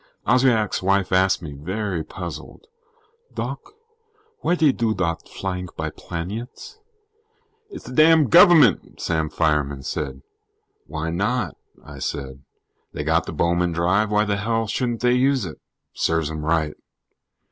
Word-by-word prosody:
Oswiak's 120 -4 +2
wife 100 0 +1
asked 95 -1 +2
me, 75 -3 -6
very 90 +4 -3
puzzled: 90 - -8 0.7
"Doc, - - -3 0.8
w'y 175 - +2
dey 155 -4 +4
do 115 -4 -1
dot 85 -3 -1
flyink 90 -2 -5
by 80 -1 -3
planyets?" 110 - -7 0.9
"It's 400 - -10
the - - -8
damn 155 +1 +5
govermint," 170 -1 +5
Sam 80 -2 -1
Fireman 75 -4 0
said. 65 -1 -4 0.6
"Why 80 +1 -4
not?" 105 +2 -1 0.3
I - - -10
said. 70 -1 -5 0.5
"They - - -4
got - - +1
the - - -4
Bowman 85 0 +1
Drive, 90 +6 +1
why 105 0 +2
the 100 -1 0
hell 115 +2 0
shouldn't 120 +2 -2
they 125 0 +3
use 130 -2 +2
it? 80 - -8 0.3
Serves 80 -2 0
'em 80 -1 -5
right." 80 -1 0
95 Hz, 135 wpm, -22 LUFS, 80-115 Hz, 0.9 s, damn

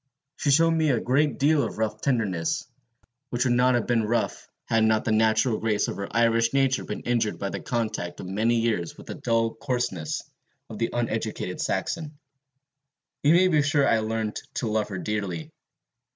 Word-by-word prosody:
She 145 - -1
showed 165 +4 +5
me 160 -2 +2
a 125 -4 +2
great 145 +4 +1
deal 145 +1 +3
of 115 - -3
rough 110 -1 -2
tenderness, 100 -11 0 0.6
which 125 +1 0
would 125 - +3
not 125 +1 +4
have 120 - 0
been 120 -2 +2
rough 115 +2 -1 0.2
had 115 -1 +2
not 110 0 +2
the - - +1
natural 110 +1 +3
grace 110 -2 +1
of - - -4
her 100 - -4
Irish 115 +1 +2
nature 135 -1 +2
been - - -5
injured 115 -3 0
by 100 - -3
the - - -4
contact 110 -7 -3
of - - -6
many 110 +6 +1
years 115 -7 -1
with - - -12
the - - -6
dull 115 -1 0
coarseness 115 - -2 0.5
of 110 - -7
the 115 - 0
uneducated 110 -5 -2
Saxon. 150 - -2 1.0
You 150 +3 +5
may 185 +1 +5
be 155 -5 +3
sure 145 -1 +2
I 115 - +3
learned 110 -1 -2 0.2
to 120 - -1
love 110 -1 0
her 95 - -4
dearly. 95 -5 -3
115 Hz, 185 wpm, -26 LUFS, 110-130 Hz, 1.0 s, showed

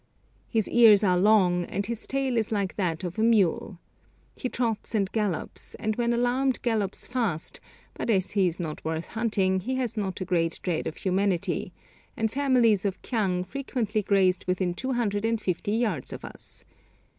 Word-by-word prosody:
His 220 -4 +1
ears 220 -4 +6
are 180 -3 +4
long, 185 -3 +4
and 200 +3 -3
his 235 -1 -4
tail 270 -2 0
is 225 -2 0
like 200 -3 -1
that 175 -3 -1
of 180 +4 -4
a - - +2
mule. 205 -5 +2 0.6
He 255 - -3
trots 230 -2 -2
and 195 -3 +1
gallops, 210 -7 -3
and 215 0 -2
when 235 0 +1
alarmed 245 +2 +1
gallops 215 -5 0
fast, 225 -11 -1 0.3
but - - -5
as 190 -4 +2
he 195 -3 +3
is 170 +1 -3
not 155 -3 -5
worth 160 +1 -3
hunting, 205 -4 +1
he 255 +8 -3
has 245 -3 -2
not 195 -4 -3
a 185 - -3
great 170 -2 0
dread 175 -4 -1
of 155 - -5
humanity, 190 -2 0 0.5
and 220 -1 0
families 250 -7 +3
of 195 -2 -2
kyang 190 -7 0
frequently 225 -1 -2
grazed 190 -2 +2
within 180 -1 0
two 260 +9 -3
hundred 210 -4 0
and 225 0 +1
fifty 195 +1 -2
yards 215 - -1
of - - -7
us. - - -10
205 Hz, 180 wpm, -27 LUFS, 185-230 Hz, 0.6 s, ears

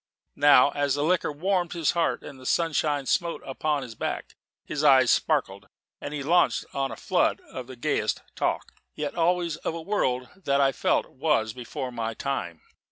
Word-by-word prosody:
And - - -20
now, 145 -1 +7
as 140 -1 0
the 145 - -1
liquor 175 0 +1
warmed 175 +3 0
his 165 -4 +1
heart 170 -1 0
and 135 -2 -10
the 130 - -13
sunshine 150 -4 +1
smote 170 +4 0
upon 145 +1 -1
his 120 -3 -8
back, - - -4 0.3
his 150 0 -3
eyes 130 -4 +6
sparkled, - - 0 0.3
and 145 - -6
he 150 -2 -4
launched 175 +5 +3
on 135 -1 -1
a - - -5
flood - - +1
of 130 -2 -9
the 130 - -9
gayest 120 - -1
talk - - -2 0.2
yet 150 -1 -3
always 170 -1 +1
of 165 - -4
a 165 - -5
world 130 -11 0
that 140 -7 0
I 135 -1 +4
felt - - +1
was 130 -6 0
before 130 +1 -6
my 115 -1 -3
time. 85 - -3
145 Hz, 185 wpm, -26 LUFS, 130-165 Hz, 0.3 s, now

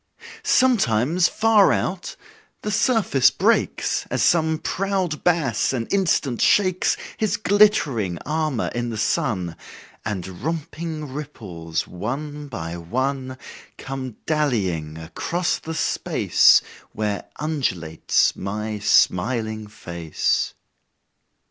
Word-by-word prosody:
Sometimes, 175 - +3
far 220 -2 +4
out, 180 -1 -2 0.5
the 210 - -2
surface 195 - +3
breaks, - - +1
As - - 0
some 160 -2 +3
proud 190 -2 -2
bass 150 -10 +1
an 120 -3 -1
instant 165 - +1
shakes 185 -3 +3 0.2
His 215 -2 0
glittering 180 - +3
armor 155 -4 -1
in 120 0 -2
the 115 - -4
sun, 95 -5 -1 0.5
And 95 -2 -5
romping 155 -1 -4
ripples, 100 - -5
one 145 +10 -5
by 85 -9 -5
one, 130 +8 -2 0.4
Come 130 -3 -6
dallyiong 95 - 0
across 170 - -2
the 160 0 -6
space 150 - +4 0.3
Where 105 -2 -2
undulates 110 - 0
my 105 +2 -4
smiling 110 +2 +2
face. 85 -6 -2
130 Hz, 100 wpm, -23 LUFS, 105-165 Hz, 0.5 s, far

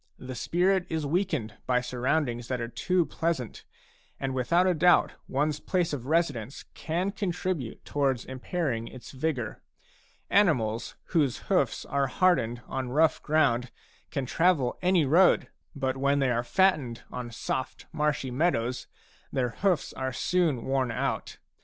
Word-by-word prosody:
The 130 0 -7
spirit 180 +8 +1
is 160 -2 -2
weakened 155 - -1
by 125 -1 +3
surroundings 125 0 -1
that 130 -1 -2
are 115 - -3
too 180 +8 +1
pleasant, 155 -4 -3 0.5
and 135 -1 -2
without 170 +8 +2
a 185 - +3
doubt 175 +2 +4 0.2
one's 150 +2 0
place 175 -3 0
of 130 -3 -4
residence 145 -7 0
can 175 +5 -2
contribute 180 - -3
towards 135 -4 0
impairing 130 -3 -3
its 130 - -10
vigour. 130 -5 -3 0.7
Animals 120 - +2
whose 145 -8 0
hoofs - - +1
are 140 -1 0
hardened 125 -7 +1
on 130 -1 -3
rough 155 +2 +3
ground 135 -6 +2 0.4
can 135 - -2
travel 155 -3 +2
any 180 -4 +3
road; 170 +7 +4 0.3
but 130 -2 -1
when 140 +1 +2
they 135 -2 +2
are 120 0 0
fattened 145 -5 +1
on 125 -1 -5
soft 130 +3 -4
marshy 150 -3 -1
meadows 125 -4 0 0.4
their 125 -2 0
hoofs 175 - 0
are 130 0 -3
soon 160 -3 0
worn 135 -1 +1
out. 115 - -2
140 Hz, 140 wpm, -28 LUFS, 125-170 Hz, 0.7 s, doubt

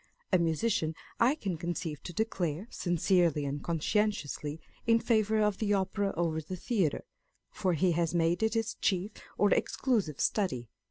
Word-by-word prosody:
A 185 - +6
musician 165 0 +1 0.2
I 250 +5 +4
can 195 - -3
conceive 165 -2 -4
to - - -5
declare, 180 -3 -1
sincerely 175 -3 +2
and 140 +1 -3
conscientiously, 165 -3 -1 0.3
in 230 0 +5
favour 220 -2 +2
of 210 -2 +1
the 205 -2 +2
Opera 195 +1 0
over 165 -2 0
the 170 +4 -6
theatre, 185 - 0 0.5
for 185 -4 0
he 175 +3 +2
has 170 0 0
made 170 +2 +2
it 220 0 +1
his 225 -1 0
chief 190 +1 0 0.3
or 205 - +3
exclusive 210 - +1
study. 130 - 0
180 Hz, 155 wpm, -31 LUFS, 160-210 Hz, 0.5 s, A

